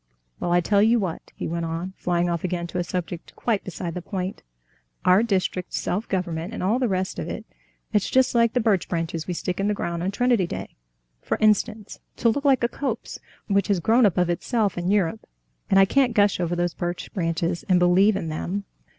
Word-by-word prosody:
Well, 175 - -1
I 175 0 +4
tell 200 +3 +3
you 230 +3 +4
what," 185 -6 -4
he - - -4
went 170 +1 -2
on, 165 +3 -4
flying 175 0 0
off 170 -2 -2
again 175 -1 -2
to 180 +1 -4
a - - +1
subject 175 -1 -5
quite 220 -4 0
beside 175 -2 -5
the 180 - -4
point, 185 +1 -4 0.6
"our 185 +3 +6
district 190 -4 -1
self 205 +6 -2
government 180 +1 -2
and - - -4
all 215 +7 +2
the 255 - +2
rest 185 -2 -2
of - - -4
it—it's 210 -3 -5
just 260 0 +3
like 235 -1 +3
the 250 - +2
birch 215 -6 +1
branches 165 -1 -2
we 180 - -2
stick 180 +2 -3
in 195 - +1
the 210 - +1
ground 170 -3 -3
on 180 - 0
Trinity 235 -3 +2
Day, - - -6 0.5
for - - -1
instance, 215 0 +1 0.2
to 235 - +2
look 280 +6 -1
like 270 -3 +4
a - - +4
copse 240 -1 -4 0.3
which 200 -2 +1
has 200 -4 +2
grown 225 +6 +4
up 185 - -2
of 180 -1 +3
itself 210 +3 0
in 175 +1 -2
Europe, 185 - +1 0.5
and 195 - +5
I 195 - +7
can't 255 +1 +2
gush 205 -2 +3
over 175 -1 0
these 175 -1 0
birch 175 0 -4
branches 170 -1 -1
and 185 - +5
believe 180 +4 +4
in 170 -5 -3
them." 180 +6 -3
185 Hz, 215 wpm, -24 LUFS, 175-215 Hz, 0.6 s, I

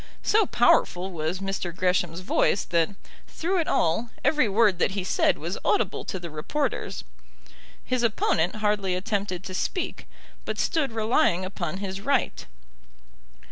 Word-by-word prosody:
So 430 -2 +3
powerful 190 -6 +3
was 165 +2 -3
Mr. 195 -3 -3
Gresham's 180 -2 0
voice 185 +1 +2
that, 165 -2 +1 0.4
through 360 +3 -1
it 325 - 0
all, 195 +9 +1 0.2
every 300 -8 +3
word 200 -3 +3
that 190 - +2
he 190 - -1
said 185 - +2
was 170 +5 -4
audible 410 - +1
to 190 - -3
the 170 -2 -7
reporters. 215 - -2 0.8
His 255 -1 0
opponent 185 -6 +1
hardly 210 -3 0
attempted 190 -1 -2
to 190 - -7
speak, 360 - -3 0.4
but - - -4
stood 305 -6 0
relying 220 - +2
upon 185 -3 -4
his 195 0 -5
right. 270 +4 0
195 Hz, 140 wpm, -26 LUFS, 180-230 Hz, 0.8 s, So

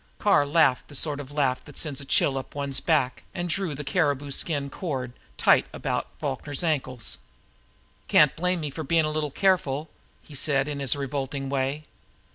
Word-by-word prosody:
Carr 195 -9 +3
laughed 145 -4 +3
the 145 - -9
sort 145 0 -1
of 145 -1 -8
laugh 135 -3 0
that 145 - -10
sends 145 -4 -1
a - - -8
chill 135 0 +3
up 135 +1 -6
one's 140 -2 +1
back, 145 -6 +1
and 175 0 -2
drew 175 -3 0
the 150 - -5
caribou 145 -2 0
skin 145 -1 0
cord 135 -8 -4 0.3
tight - - +4
about - - -2
Falkner's 145 +1 -2
ankles. 130 -7 -1 0.9
"Can't 150 -3 +5
blame 180 +1 0
me 150 -2 -3
for 160 +3 -5
being 160 +2 +2
a 155 - -1
little 155 -1 -1
careful," 155 -4 +1 0.3
he 150 - -14
said 140 0 +2
in 145 -1 -4
his 135 -2 +3
revolting 140 0 -3
way. 140 +2 -1
145 Hz, 180 wpm, -26 LUFS, 135-155 Hz, 0.9 s, Can't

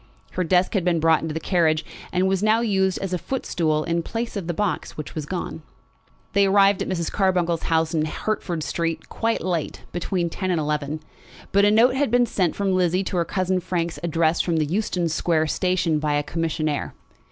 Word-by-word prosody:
Her 185 - -1
desk 180 +2 +2
had 195 -5 +1
been 175 -2 +2
brought 160 0 +4
into 160 -1 -4
the - - -1
carriage 160 -3 +1 0.3
and 185 +1 +2
was 190 0 +1
now 215 +2 +3
used 190 -4 +1
as 195 -2 -4
a 180 - 0
foot 265 +8 -4
stool 155 -3 0
in 170 +1 0
place 230 +7 -4
of 195 -5 -4
the - - 0
box 205 -1 -2
which 155 - -6
was 155 -2 -5
gone. 175 -2 -4 0.7
They 200 0 +4
arrived 195 0 +4
at - - -2
Mrs. 170 -3 -2
Carbuncle's 180 -4 +1
house 160 0 +2
in 155 -1 +1
Hertford 175 -1 -3
Street 165 +2 -3
quite 230 0 -1
late, 175 -5 -2
between 175 0 -2
ten 185 +1 -3
and 175 -3 +1
eleven; 150 0 -2 0.5
but 200 +1 +4
a - - +5
note 230 +4 +5
had 275 0 +1
been 245 +1 +4
sent 185 -7 0
from 195 -1 0
Lizzie 185 0 +2
to 185 - -3
her 170 - +2
cousin 185 +1 0
Frank's 170 -2 -2
address 165 -1 +1
from 170 -2 0
the 155 - +2
Euston 180 +1 -1
Square 160 0 +1
station 170 -1 +1
by 150 -1 0
a 145 - +1
commissionaire. 155 -2 -2
175 Hz, 210 wpm, -23 LUFS, 160-195 Hz, 0.7 s, a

